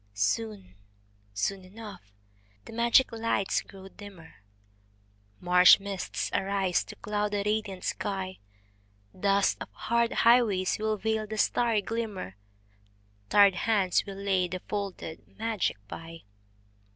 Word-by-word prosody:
Soon, 100 -1 -1 0.6
soon 185 - -2
enough 195 - -11 0.5
the - - -10
magic 235 +3 +4
lights 225 -4 0
grow 190 -1 -13
dimmer, 195 -5 -13 1.0
Marsh 180 0 +7
mists 195 -2 -4
arise 195 -2 +1
to - - -10
cloud 210 0 -2
the 200 -1 0
radiant 210 -3 -2
sky, 190 -2 -3 0.8
Dust 200 +1 +2
of - - -6
hard 235 0 0
highways 230 -6 +3
will 215 0 0
veil 220 0 -1
the 215 +1 -5
starry 225 -1 +2
glimmer, 215 - -4 0.9
Tired 200 -2 +6
hands 195 -1 +1
will 195 - -6
lay 195 -2 0
the 185 +1 -5
folded 195 -5 -6
magic 220 - -1
by. 165 +7 -9
200 Hz, 115 wpm, -28 LUFS, 185-215 Hz, 1.0 s, Marsh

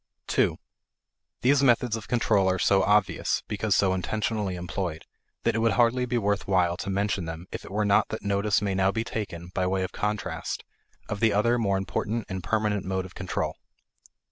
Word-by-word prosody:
2. - - +1 0.8
These 135 +2 +4
methods 120 -3 +3
of 110 - -7
control 100 -5 +2
are 95 - +1
so 95 +1 +3
obvious 105 -1 +2
(because 105 -1 0
so 95 -2 +3
intentionally 105 +1 -1
employed) 90 -2 -4 0.4
that - - +2
it 110 - 0
would 115 0 +3
hardly 125 +1 +3
be 120 0 0
worth 100 -2 0
while 90 -3 +2
to 95 +2 -5
mention 100 -2 0
them 80 +1 -6
if - - -6
it - - -10
were 105 +1 0
not 100 0 +3
that 110 - -5
notice 100 +1 +1
may 100 -1 0
now 95 0 +2
be 110 +3 -1
taken, 90 -7 -5
by 90 -1 0
way 95 0 0
of 90 - -4
contrast, 105 0 -3 0.4
of 105 - -4
the 115 -2 +4
other 115 +4 +2
more 100 -4 +1
important 100 +4 -2
and 95 -2 -4
permanent 105 0 0
mode 95 0 -2
of 95 - -11
control. 95 -1 -3
100 Hz, 195 wpm, -27 LUFS, 95-110 Hz, 0.8 s, These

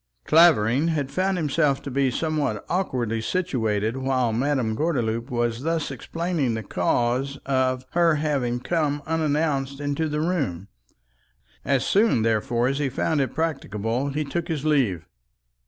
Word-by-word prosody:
Clavering 155 -4 +5
had 145 -5 -1
found 185 +4 0
himself 150 -3 +1
to 140 - -5
be 135 0 +2
somewhat 145 -5 -1
awkwardly 125 - -1
situated 110 - -1
while 130 -3 0
Madame 130 -2 0
Gordeloup 120 -4 -1
was 120 -1 -1
thus 160 -1 -1
explaining 155 -1 -2
the 110 - -4
causes 120 +9 0
of 130 -1 0
her 170 -2 +3
having 135 -5 -1
come 145 0 -1
unannounced 150 -3 0
into 145 +2 -1
the 150 0 -2
room; 140 - -2 0.9
as 135 -2 +1
soon, 200 - +3
therefore, 115 +2 +1
as 135 +2 -1
he 145 -2 0
found 145 +3 0
it 135 - -2
practicable, 135 -5 -2
he 150 +2 -2
took 170 +4 -3
his 155 -3 -3
leave. 120 - +1
140 Hz, 140 wpm, -24 LUFS, 120-155 Hz, 0.9 s, Clavering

